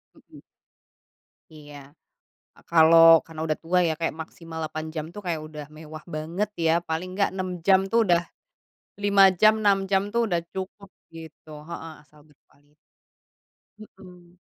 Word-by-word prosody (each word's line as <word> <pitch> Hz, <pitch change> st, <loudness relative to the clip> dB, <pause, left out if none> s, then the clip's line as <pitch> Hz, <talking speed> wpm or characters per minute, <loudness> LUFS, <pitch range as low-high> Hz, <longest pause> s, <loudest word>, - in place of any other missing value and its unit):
Hmm. -, -, -18 dB, 1.1 s
Iya. 145 Hz, -2 st, -14 dB, 0.7 s
Kalau 165 Hz, 0 st, +7 dB
karena 160 Hz, -1 st, -11 dB
udah 155 Hz, -, -2 dB
tua 180 Hz, +2 st, 0 dB
ya, 160 Hz, -, 0 dB
kayak 165 Hz, -2 st, -2 dB
maksimal 160 Hz, 0 st, -9 dB
8 155 Hz, 0 st, -5 dB
jam 155 Hz, -1 st, -5 dB
tuh 205 Hz, -, -8 dB
kayak 170 Hz, -4 st, -3 dB
udah 150 Hz, -1 st, -9 dB
mewah 155 Hz, 0 st, -11 dB
banget 170 Hz, +7 st, -3 dB
ya, 165 Hz, -1 st, +2 dB
paling 175 Hz, +3 st, -5 dB
enggak 200 Hz, +1 st, +1 dB
6 185 Hz, -2 st, -5 dB
jam 190 Hz, +1 st, +4 dB
tuh 230 Hz, +4 st, 0 dB
udah 170 Hz, -1 st, +3 dB, 0.8 s
lima 200 Hz, -1 st, +5 dB
jam, 215 Hz, +4 st, +5 dB
6 200 Hz, -2 st, +2 dB
jam 195 Hz, 0 st, +3 dB
tuh 235 Hz, -, +2 dB
udah 175 Hz, -, +1 dB, 0.2 s
cukup, 190 Hz, +1 st, -7 dB, 0.2 s
gitu 160 Hz, -1 st, -13 dB, 0.2 s
heeh, 165 Hz, -1 st, -8 dB
asal 150 Hz, 0 st, -23 dB
berkuali 145 Hz, 0 st, -30 dB, 1.2 s
Hmm. 180 Hz, -1 st, -17 dB
165 Hz, 145 wpm, -24 LUFS, 155-185 Hz, 1.2 s, Kalau